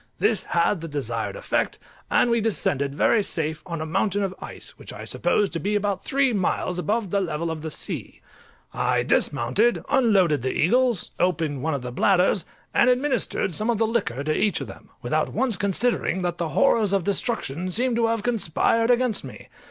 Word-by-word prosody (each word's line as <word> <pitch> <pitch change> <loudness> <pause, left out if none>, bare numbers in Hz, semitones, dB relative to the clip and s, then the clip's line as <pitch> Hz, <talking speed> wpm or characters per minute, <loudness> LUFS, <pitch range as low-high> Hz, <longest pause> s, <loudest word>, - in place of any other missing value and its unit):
This 210 -4 +2
had 170 0 0
the 165 - -5
desired 120 -7 -3
effect, - - -1 0.3
and 240 - +3
we 235 -1 +2
descended 140 -10 0
very 215 +7 +3
safe 160 -5 -2
on 170 -2 -4
a - - -2
mountain 200 +5 0
of 190 -1 -2
ice, - - -6
which - - -9
I - - -8
supposed 205 -3 0
to 165 - -1
be 205 +6 -1
about 200 -2 -1
three 270 -2 +1
miles 180 -2 -1
above 205 0 -1
the 200 - +1
level 165 -2 -2
of 160 -1 -5
the 160 - -4
sea. - - -5 0.5
I - - +1
dismounted, 145 - +1
unloaded 200 - +3
the 130 +1 -1
eagles, 245 +4 +2
opened 160 -6 0
one 160 +1 -1
of 135 - -5
the 125 - -5
bladders, 180 +6 +2 0.3
and 245 - +4
administered 250 -7 +1
some 215 +8 0
of 235 - +2
the 225 - +2
liquor 200 - -1
to 155 +1 0
each 210 - +1
of - - -5
them, - - -12
without - - -1
once 255 -5 +2
considering 200 -1 0
that 175 -1 -2
the 170 -2 -1
horrors 205 +7 +3
of 195 -3 +2
destruction 185 - -1
seemed 245 +6 0
to 230 -1 +2
have 225 -2 -1
conspired 230 +1 +1
against 245 -2 +2
me. - - -11
195 Hz, 190 wpm, -24 LUFS, 160-230 Hz, 0.5 s, and